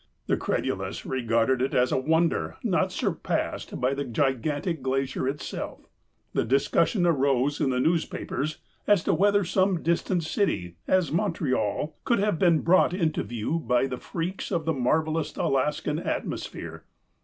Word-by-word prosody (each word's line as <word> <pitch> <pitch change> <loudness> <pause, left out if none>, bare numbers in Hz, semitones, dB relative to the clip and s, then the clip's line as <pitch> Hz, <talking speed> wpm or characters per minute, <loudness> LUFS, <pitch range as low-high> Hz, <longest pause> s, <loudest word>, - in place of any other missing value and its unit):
The - - +2
credulous - - -2
regarded 120 0 +1
it 130 - 0
as 125 0 +3
a - - +2
wonder 160 - +1
not - - +1
surpassed - - -2
by 130 +2 +1
the 140 +1 -2
gigantic 145 - -1
glacier 130 0 -1
itself. 140 +2 -5 0.5
The - - +1
dis 135 +5 +2
cussion 175 +2 +2
arose 140 -3 +2
in - - +2
the 125 -1 0
newspapers 155 -1 -1 0.3
as 205 -4 +4
to 200 - +2
whether 205 +4 +3
some 185 0 +1
distant 170 +1 +1
city, 155 - -1
as 185 -6 +2
Montreal, 150 - -1
could 235 - +2
have 200 -5 +1
been 170 -4 +4
brought 180 +1 +4
into 165 -5 0
view 120 +8 -2
by 125 -5 +2
the 130 -2 -4
freaks 175 +3 -4
of 170 -5 -1
the 160 - +1
marvelous 155 +4 0
Alaskan 150 +2 0
atmosphere. - - -4
150 Hz, 150 wpm, -26 LUFS, 130-170 Hz, 0.5 s, as